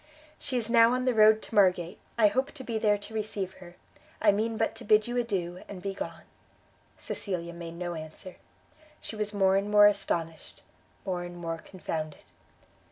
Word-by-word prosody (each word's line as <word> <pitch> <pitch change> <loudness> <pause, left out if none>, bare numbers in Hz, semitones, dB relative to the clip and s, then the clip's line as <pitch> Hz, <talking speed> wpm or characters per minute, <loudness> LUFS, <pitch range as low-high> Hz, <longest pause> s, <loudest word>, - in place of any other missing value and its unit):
"She 260 -3 -3
is 230 -3 -1
now 230 0 +6
on 255 0 0
the 255 - +3
road 215 0 +6
to - - -11
Margate; 180 -2 +3 0.2
I 225 - +5
hope 260 +6 +2
to 270 - -8
be 230 -3 -2
there 210 -1 +3
to 205 +2 -11
receive 210 -3 -3
her. 175 -1 -12 0.4
I 210 - +5
mean 220 +2 -1
but 225 - 0
to - - -10
bid 215 0 +4
you 240 - -4
adieu, 185 -7 -2
and 200 - -8
be 195 +1 -4
gone." - - -6 0.7
Cecilia 170 -4 -4
made 170 -1 -8
no 175 0 -4
answer; 160 +3 -9 0.6
she - - -8
was 210 -1 -1
more 195 -2 +3
and 200 +1 -1
more 210 0 +7
astonished, 170 -6 -1 0.4
more 180 -2 -2
and 175 0 -7
more 165 -1 -4
confounded. 160 -5 -6
200 Hz, 185 wpm, -28 LUFS, 175-220 Hz, 0.7 s, more